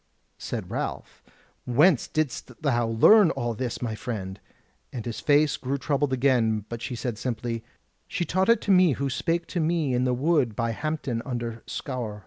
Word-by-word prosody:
Said - - -5
Ralph: - - -5 0.4
"Whence 145 +4 +4
didst 150 -3 -3
thou 120 -5 +2
learn 170 - +6
all 120 -5 -2
this, 125 +2 -4
my 115 -2 -2
friend?" 100 -4 -5 0.5
And 120 -4 -6
his 115 -2 -4
face 145 0 +3
grew 135 +2 -2
troubled 140 0 0
again; 120 -5 +2
but 115 -1 -6
she 125 - -4
said 120 -2 -4
simply: 115 -1 -3 0.4
"She 175 - -2
taught 190 +5 +1
it 230 - +5
to 205 - 0
me 180 -5 +5
who 135 +2 -2
spake 170 +5 -1
to 180 - -2
me 160 -4 +1
in 125 0 +1
the 125 -1 +1
wood 140 -4 +1
by 115 +1 -1
Hampton 145 -3 -3
under 120 -3 -4
Scaur." 120 -6 -4
125 Hz, 175 wpm, -26 LUFS, 115-155 Hz, 0.5 s, learn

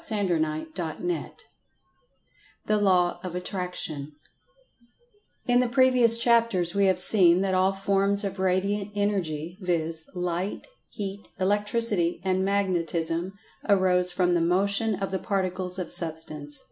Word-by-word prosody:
[Pg 215 -2 -2
135] 155 -1 -2
CHAPTER 175 0 -3
X 165 - -8 1.2
THE 215 - +1
LAW 180 -4 +2
OF 180 -1 -6
ATTRACTION 180 -6 -3 1.3
IN 245 0 +3
the 250 -1 +1
previous 250 -3 +5
chapters 230 -7 +2
we 200 -1 +2
have 190 -1 +2
seen 180 -2 +4
that 195 -1 0
all 185 +1 +2
forms 195 +1 +1
of 195 -1 -4
Radiant 195 +2 0
Energy, 180 -4 -2
viz., 165 -3 -2
Light, 180 +2 -3 0.2
Heat, 200 -1 -6
Electricity 205 -2 +1
and 185 0 +1
Magnetism, 175 -3 -1 0.4
arose 185 -2 +4
from 180 0 +1
the 170 - +2
Motion 200 +5 +1
of 195 0 -4
the 190 - -2
Particles 185 -2 -3
of 180 -3 -5
Substance. 155 -3 -1
185 Hz, 130 wpm, -26 LUFS, 175-200 Hz, 1.3 s, previous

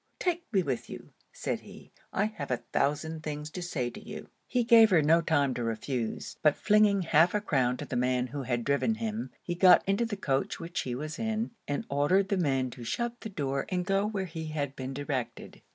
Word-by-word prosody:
take 345 -4 -2
me 195 -4 +3
with 130 -6 -3
you,' - - -10 0.2
said - - -3
he. - - -14 0.2
'I 200 - +1
have 215 -10 -5
a 125 - +1 0.2
thousand 160 +3 0
things 150 -1 -5
to 180 - -5
say 150 -8 -2
to - - -9
you.' - - -8 0.2
He 245 - +1
gave 225 -2 +7
her 170 -6 +4
no 165 +3 +5
time 145 -4 +2
to 120 - -3
refuse: 115 +1 -3
but 150 -2 +4
flinging 210 -2 +4
half 165 +3 +4
a - - +3
crown 130 -10 +1
to - - -6
the - - -5
man 125 0 +1
who 140 +3 -5
had 120 -2 -1
driven 140 - +1
him, 225 +1 -3
he 175 - -2
got 180 +1 +6
into 200 +4 +2
the 205 -2 -4
coach 135 -8 -1
which 170 +2 -4
she 125 -2 -2
was 155 - -5
in, 225 0 -1 0.2
and 145 - -2
ordered 165 +8 +2
the 200 - +1
man 135 -7 +1
to 120 - -9
shut 235 - -3
the 220 - -5
door 140 -7 -2
and 180 -1 -1
go 195 +1 +2
where 200 -3 -2
he 160 -2 -6
had 145 -3 -3
been 130 0 -5
directed. 130 -5 -4
160 Hz, 220 wpm, -29 LUFS, 135-200 Hz, 0.2 s, gave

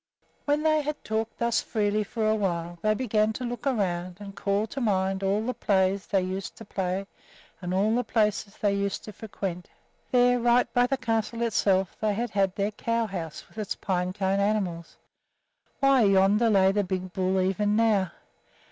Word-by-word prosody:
When 295 +1 +1
they 310 -1 +3
had 300 +1 -4
talked 220 +1 -2
thus 235 -1 +1
freely 210 -1 0
for 220 +1 -2
a 215 - +3
while 175 -5 -2
they 215 0 +2
began 215 -3 +1
to 255 - -5
look 245 +1 -4
around 180 -7 -1
and 200 -1 -9
call 200 +1 0
to 265 +5 -6
mind 190 -3 0
all 200 +3 0
the 250 - -1
plays 195 -3 +1
they 195 -2 +1
used 190 +1 -4
to 225 - -11
play 190 0 -2 0.6
and 180 -1 -4
all 200 +4 +2
the 245 - +1
places 210 -3 0
they 205 -1 +1
used 200 0 -2
to 215 - -9
frequent. 190 -4 -6 0.4
There, 245 -1 +4
right 240 +1 +4
by 245 0 +4
the 270 - 0
castle 230 -1 -1
itself, 195 -4 +1
they 215 -2 +1
had 235 +3 -2
had 195 -2 +1
their 200 +1 0
cow 230 +2 -1
house 170 -6 -6
with 220 - -11
its 210 - -3
pine 180 -2 -1
cone 190 0 0
animals 195 -5 -1 0.8
why, 275 -2 +5
yonder 200 +4 +4
lay 190 -2 +4
the 205 +1 +1
big 185 -1 -4
bull 190 0 +1
even 200 +3 +1
now! 215 -5 +3
205 Hz, 185 wpm, -27 LUFS, 190-225 Hz, 0.8 s, why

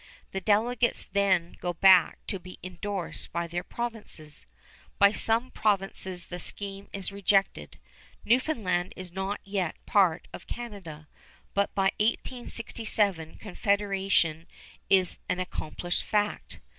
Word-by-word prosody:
The 195 - -3
delegates 230 +4 +2
then 190 -3 +1
go 175 - -1
back 185 0 +6
to 195 - -3
be 185 +1 -11
indorsed 185 +1 -4
by 170 +1 -1
their 175 +1 -3
provinces. 215 -10 -6 0.5
By 200 -1 +7
some 230 +3 +2
provinces 195 -3 0
the 180 - -6
scheme 200 +2 -5
is 195 0 -4
rejected. 200 0 +1 0.5
Newfoundland 210 - +1
is 185 -2 -8
not 190 +2 -2
yet 195 -5 -1
part 185 -6 +3
of - - -9
Canada, 190 -11 -7 0.5
but 200 0 +1
by 195 0 +3
1867 215 -6 0
Confederation 195 -5 +1 0.4
is 185 -2 +4
an 180 - 0
accomplished 175 -1 -3
fact. 210 -1 -1
195 Hz, 120 wpm, -28 LUFS, 180-210 Hz, 0.5 s, By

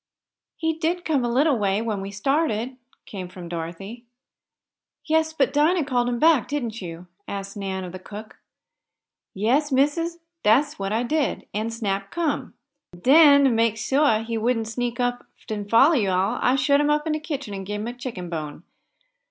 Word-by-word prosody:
"He 320 -1 -1
did 335 +2 -2
come 290 -5 +1
a 240 - 0
little 270 0 +3
way, 200 0 +1
when 220 -3 -2
we 195 - -5
started," 255 +2 -1 0.3
came 185 -3 -7
from 180 -1 -9
Dorothy. 175 +7 -6 1.0
"Yes, 315 0 +2
but 285 -4 0
Dinah 310 +2 +3
called 245 -3 +1
him 240 - -1
back; 315 -1 +4
didn't 235 -7 -3
you?" 170 -1 -8 0.2
asked 195 0 -6
Nan 190 -2 -4
of 180 - -7
the 185 - -8
cook. 210 +3 -10 1.0
"Yes, 260 +9 +1
missis, 300 +6 +1 0.2
dat's 280 +7 +3
what 195 0 -2
I 225 +3 +1
did. 295 +2 -1
An' 215 +3 -2
Snap 200 -4 -3
come. 325 0 -2 0.4
Den, 285 - +7
t' 270 - +4
make 225 -1 +2
suah 225 -1 +2
he 225 0 -3
wouldn't 225 0 0
sneak 240 +1 -3
off 245 0 0 0.3
an' 205 -1 -4
foller 275 +8 +6
yo' 200 -5 +1
all, 195 +3 0
I 250 - +3
shut 280 +2 +3
him 295 - +1
up 300 +1 +1
in 315 - 0
de 310 - -1
kitchen 285 -8 -5
an' 195 -1 -5
gibe 205 +2 -4
him 220 - -4
a 240 - -4
chicken 245 -8 -6
bone. 155 -2 -6
235 Hz, 185 wpm, -24 LUFS, 200-290 Hz, 1.0 s, Den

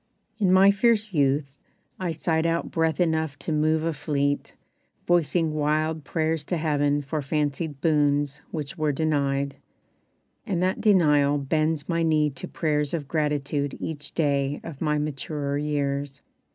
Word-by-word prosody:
In 190 -4 +3
my 190 +1 +7
fierce 215 0 +2
youth 140 -1 +1 0.4
I 180 -2 -1
sighed 160 0 0
out 165 0 -1
breath 160 -2 0
enough 160 -4 0
to 150 - -5
move 155 +1 +2
a 165 0 0
fleet 145 -1 -1 0.5
Voicing 170 -2 +2
wild 155 +1 0
prayers 160 +1 -1
to 175 - -1
heaven 145 -2 +1
for 150 +2 -3
fancied 145 0 -2
boons 145 -3 +1
Which 150 -3 -5
were 155 -1 +2
denied; 140 -2 0 0.9
and 190 -6 -2
that 185 +1 0
denial 150 -8 +4
bends 155 +2 0
My 170 -1 0
knee 155 -2 +2
to 140 +7 -7
prayers 150 -2 -1
of 145 -4 -5
gratitude 145 -2 -1
each 150 -3 -5
day 140 -2 +1
Of 155 -5 -9
my 150 -1 +1
maturer 145 -1 -3
years. 145 -1 -2
150 Hz, 145 wpm, -25 LUFS, 145-160 Hz, 0.9 s, my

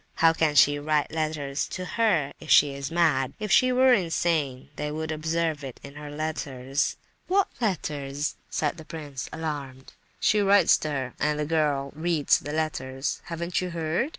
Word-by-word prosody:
How 165 0 +5
can 160 -2 +1
she 145 0 +5
write 150 0 0
letters 155 -3 -2
to 185 - -5
her, 180 -10 +1
if - - -11
she's 140 0 +4
mad? 150 -6 +2
If 210 -2 -3
she 255 +5 +5
were 255 0 +5
insane 165 - 0
they 150 0 -3
would 160 +1 -3
observe 160 -1 -1
it 130 -3 -8
in 140 - -10
her 150 0 -8
letters." 145 -2 -2 0.3
"What 390 +1 +2
letters?" 145 - -2
said 150 +2 -1
the 160 - -10
prince, 145 -5 -7
alarmed. 140 -5 -6 0.3
"She 215 - +3
writes 200 0 +5
to 155 - -3
her—and 145 +2 -2
the 150 - -1
girl 145 -3 0
reads 160 -2 +2
the 145 - -6
letters. 135 -4 -2
Haven't 170 +1 -2
you 180 - -3
heard? 170 - -1
155 Hz, 165 wpm, -26 LUFS, 140-165 Hz, 0.3 s, How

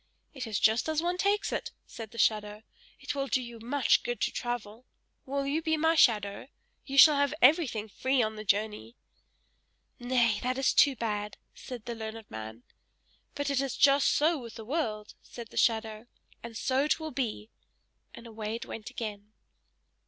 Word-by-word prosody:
"It 260 -5 -6
is 215 -3 -1
just 220 +7 +3
as 315 +1 0
one 355 +1 -1
takes 405 +1 +1
it!" - - -3 0.2
said 225 -2 -9
the 230 - -14
shadow. 210 -1 0 0.4
"It - - -4
will 275 -1 -2
do 260 - +1
you 235 -2 -8
much 260 +5 +2
good 485 -1 -4
to - - +1
travel! 240 -1 -5 0.4
Will 275 +1 -2
you 290 +4 0
be 315 0 0
my 320 +1 +3
shadow? 215 -8 +2 0.4
You 275 0 -5
shall 295 +1 +9
have 285 +1 +1
everything 255 -7 +3
free 260 +4 0
on 215 0 -2
the 215 - -7
journey!" 210 +3 -1 1.0
"Nay, 240 -3 +2
that 255 +1 -1
is 270 - +2
too 280 -2 +5
bad!" 210 -3 -3 0.2
said 245 -4 -9
the 240 - -4
learned 220 -1 -8
man. 110 +2 -8 0.7
"But 285 0 -2
it 275 -1 +1
is 275 -1 -3
just 280 0 +5
so 310 +1 +2
with 235 -3 -10
the 225 -2 -9
world!" 220 -7 -3
said 235 -2 -10
the - - -15
shadow, 220 0 0 0.3
"and 230 -1 -8
so 265 +3 +1
it 305 - +1
will 315 -1 -5
be!" 230 -4 -4 0.6
and 235 - -12
away 220 -1 -5
it 230 - -6
went 225 0 -7
again. 215 -4 -7
240 Hz, 180 wpm, -29 LUFS, 215-280 Hz, 1.0 s, shall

